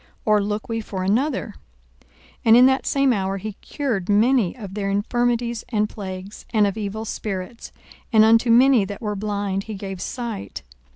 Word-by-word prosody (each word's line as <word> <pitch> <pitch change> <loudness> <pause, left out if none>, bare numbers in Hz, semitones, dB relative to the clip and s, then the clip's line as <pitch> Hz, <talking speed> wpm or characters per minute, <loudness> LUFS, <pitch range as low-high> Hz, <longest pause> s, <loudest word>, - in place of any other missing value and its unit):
or 210 -1 +4
look 210 +1 -3
we 225 -1 -2
for 190 -3 -5
another? 230 +3 0 0.5
42:007:021 - - -30 0.4
And 225 +1 +7
in 250 - +8
that 265 0 +2
same 275 -2 +3
hour 195 -2 -1
he 215 +2 -6
cured 225 -11 -3
many 225 0 +3
of 200 -5 -8
their 200 -1 -2
infirmities 235 +3 0
and 210 -3 +1
plagues, 190 -1 -8
and 215 -3 +3
of 200 - -1
evil 220 +1 -4
spirits; 210 +1 -5 0.4
and 220 -2 +6
unto 230 +2 +4
many 245 -1 +6
that 200 +1 -6
were 210 -1 -2
blind 200 -1 -2
he 220 - -6
gave 195 -2 -6
sight. 230 - -5
215 Hz, 175 wpm, -22 LUFS, 200-235 Hz, 0.5 s, in